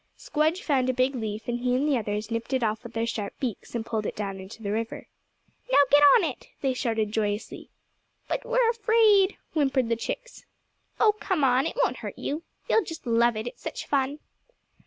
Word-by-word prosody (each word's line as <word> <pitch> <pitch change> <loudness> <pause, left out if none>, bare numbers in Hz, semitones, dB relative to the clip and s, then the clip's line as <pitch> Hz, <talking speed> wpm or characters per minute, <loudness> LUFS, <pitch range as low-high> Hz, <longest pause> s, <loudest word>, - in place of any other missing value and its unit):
Squdge 315 +6 0
found 265 - +1
a 255 - 0
big 255 +2 +2
leaf 220 -3 -4
and 240 0 -1
he 250 0 +1
and 275 +4 +1
the 290 - +3
others 215 -1 -3
nipped 230 +3 -3
it 260 -2 +1
off 215 0 -1
with 235 -1 -10
their 225 0 0
sharp 215 -3 -4
beaks, 245 -2 -4
and 225 -1 -2
pulled 220 -2 -2
it - - -4
down 195 -2 -4
into 195 +4 -10
the 200 - -2
river. 225 +2 -3 0.7
"Now - - +5
get 290 +1 +7
on 450 - +4
it," - - -4
they 270 -2 +1
shouted 225 -4 -1
joyously. 210 -1 -3 0.6
"But - - -2
we're - - +2
afraid," 440 -4 +4 0.2
whimpered 270 -5 +1
the 230 - +2
chicks. - - -6 0.6
"Oh, 440 - +6
come 365 -7 0
on! 260 0 +3
it - - -5
won't - - 0
hurt - - -7
you. 300 +3 -3 0.3
You'll 445 - +3
just 325 -3 -8
love 235 -1 +3
it, 215 - -3
it's 245 - -8
such - - -5
fun." 280 0 0
250 Hz, 205 wpm, -26 LUFS, 225-295 Hz, 0.7 s, get